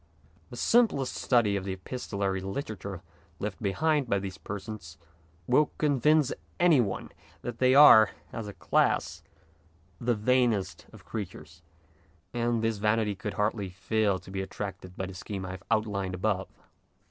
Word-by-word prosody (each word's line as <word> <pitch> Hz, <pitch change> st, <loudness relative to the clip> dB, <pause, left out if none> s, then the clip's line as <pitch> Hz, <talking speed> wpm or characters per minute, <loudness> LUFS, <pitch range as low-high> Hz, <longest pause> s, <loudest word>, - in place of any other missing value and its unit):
The -, -, -9 dB
simplest 220 Hz, -, +3 dB
study 115 Hz, -5 st, +2 dB
of 100 Hz, -, -2 dB
the 95 Hz, 0 st, -3 dB
epistolary 100 Hz, -2 st, -3 dB
literature 100 Hz, -3 st, -5 dB, 0.3 s
left 105 Hz, 0 st, -5 dB
behind 145 Hz, +6 st, +1 dB
by 100 Hz, -, +2 dB
these 95 Hz, -1 st, -5 dB
persons 100 Hz, -2 st, -7 dB, 0.5 s
will 145 Hz, -, +3 dB
convince 150 Hz, 0 st, +3 dB, 0.3 s
any 170 Hz, -6 st, +5 dB
one 100 Hz, -5 st, -3 dB, 0.3 s
that 120 Hz, -1 st, -5 dB
they 130 Hz, 0 st, +4 dB
are, 110 Hz, -8 st, +9 dB, 0.2 s
as 115 Hz, -2 st, -5 dB
a 105 Hz, -, -7 dB
class, -, -, +1 dB, 0.8 s
the 120 Hz, 0 st, +1 dB
vainest 110 Hz, -6 st, +1 dB
of -, -, -15 dB
creatures, 90 Hz, -5 st, -7 dB, 0.7 s
and 120 Hz, -1 st, 0 dB
this 115 Hz, -1 st, 0 dB
vanity 105 Hz, 0 st, +1 dB
could 100 Hz, +1 st, -6 dB
hardly 105 Hz, -2 st, -1 dB
fail 100 Hz, +2 st, 0 dB
to 95 Hz, -, -13 dB
be 95 Hz, 0 st, -2 dB
attracted 95 Hz, -1 st, -7 dB
by 95 Hz, -, -2 dB
the 95 Hz, -, -8 dB
scheme 95 Hz, +1 st, -6 dB
I 90 Hz, -, -5 dB
have 95 Hz, -, -9 dB
out 110 Hz, -1 st, +2 dB
lined 100 Hz, -3 st, -3 dB
above. 95 Hz, 0 st, -1 dB
105 Hz, 150 wpm, -28 LUFS, 95-120 Hz, 0.8 s, are